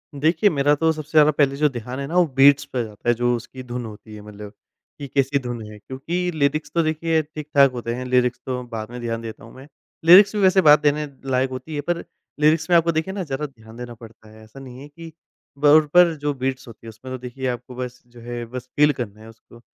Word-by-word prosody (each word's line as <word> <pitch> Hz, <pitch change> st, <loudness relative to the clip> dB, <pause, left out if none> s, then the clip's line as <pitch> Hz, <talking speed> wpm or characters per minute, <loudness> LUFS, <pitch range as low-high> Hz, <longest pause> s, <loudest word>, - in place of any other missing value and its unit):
देखिए 160 Hz, +7 st, +2 dB
मेरा 145 Hz, -3 st, +2 dB
तो 160 Hz, +2 st, +2 dB
सबसे 155 Hz, -1 st, -9 dB
ज़्यादा 155 Hz, -1 st, +5 dB
पहले 140 Hz, -2 st, +1 dB
जो 150 Hz, +2 st, +2 dB
ध्यान 125 Hz, 0 st, -7 dB
है 140 Hz, -, -3 dB
ना 165 Hz, -, -5 dB
वो 180 Hz, -, +5 dB
बीट्स 140 Hz, +1 st, +5 dB
पे 125 Hz, -2 st, -3 dB
जाता 110 Hz, +1 st, -5 dB
है, -, -, +5 dB
जो 120 Hz, +1 st, +1 dB
उसकी 130 Hz, +2 st, -9 dB
धुन 125 Hz, -1 st, -6 dB
होती 110 Hz, 0 st, -11 dB
है 105 Hz, -, -10 dB
मतलब 105 Hz, 0 st, -11 dB, 0.5 s
कि 140 Hz, -, -6 dB
कैसी 135 Hz, +1 st, 0 dB
धुन 120 Hz, -3 st, -6 dB
है। 105 Hz, -, -11 dB
क्योंकि 170 Hz, -, -4 dB
लीरिक्स 150 Hz, -1 st, -1 dB
तो 170 Hz, -, +3 dB
देखिए 160 Hz, +1 st, 0 dB
ठीक-ठाक 150 Hz, -3 st, +1 dB
होते 120 Hz, -2 st, -4 dB
हैं, 125 Hz, +1 st, -6 dB
लीरिक्स 125 Hz, -1 st, +1 dB
तो 125 Hz, -1 st, -3 dB
बाद 110 Hz, -1 st, -7 dB
में 125 Hz, -, -7 dB
ध्यान 115 Hz, -1 st, -3 dB
देता 110 Hz, -2 st, -9 dB
हूँ 115 Hz, -, -14 dB
मैं। 135 Hz, +2 st, -13 dB, 0.4 s
लीरिक्स 195 Hz, +5 st, +8 dB
भी 210 Hz, -, 0 dB
वैसे 190 Hz, 0 st, +5 dB
बात 150 Hz, -3 st, +7 dB
देने 150 Hz, +1 st, +1 dB, 0.3 s
लायक 130 Hz, +1 st, +1 dB
होती 130 Hz, +5 st, -7 dB
है 145 Hz, -, -2 dB
पर 175 Hz, -1 st, -1 dB, 0.4 s
लीरिक्स 155 Hz, +2 st, +2 dB
में 175 Hz, -, +4 dB
आपको 170 Hz, 0 st, +2 dB
देखिए 160 Hz, +4 st, -2 dB
ना 195 Hz, -1 st, -3 dB
ज़्यादा 150 Hz, -1 st, -4 dB
ध्यान 110 Hz, -5 st, -14 dB
देना 120 Hz, -1 st, -8 dB
पड़ता 110 Hz, -1 st, -15 dB
है। 110 Hz, 0 st, -16 dB
ऐसा 110 Hz, +5 st, -14 dB
नहीं 130 Hz, -2 st, -11 dB
है 145 Hz, -, -10 dB
कि 165 Hz, +3 st, -12 dB, 0.5 s
ब 145 Hz, -, -3 dB
उन 155 Hz, -1 st, +5 dB
पर 175 Hz, -1 st, +6 dB
जो 145 Hz, 0 st, -1 dB
बीट्स 130 Hz, -1 st, -4 dB
होती 115 Hz, -1 st, -14 dB
है -, -, -6 dB
उसमें 115 Hz, +4 st, -10 dB
तो -, -, -4 dB
देखिए 125 Hz, +1 st, -5 dB
आपको 125 Hz, 0 st, -5 dB
बस 125 Hz, 0 st, -6 dB
जो 120 Hz, 0 st, -17 dB
है 120 Hz, 0 st, -6 dB
बस 125 Hz, +2 st, -8 dB
फ़ील 150 Hz, 0 st, +4 dB
करना 110 Hz, -5 st, -7 dB
है 110 Hz, -, -13 dB
उसको, 115 Hz, +1 st, -18 dB
130 Hz, 250 wpm, -22 LUFS, 120-150 Hz, 0.5 s, लीरिक्स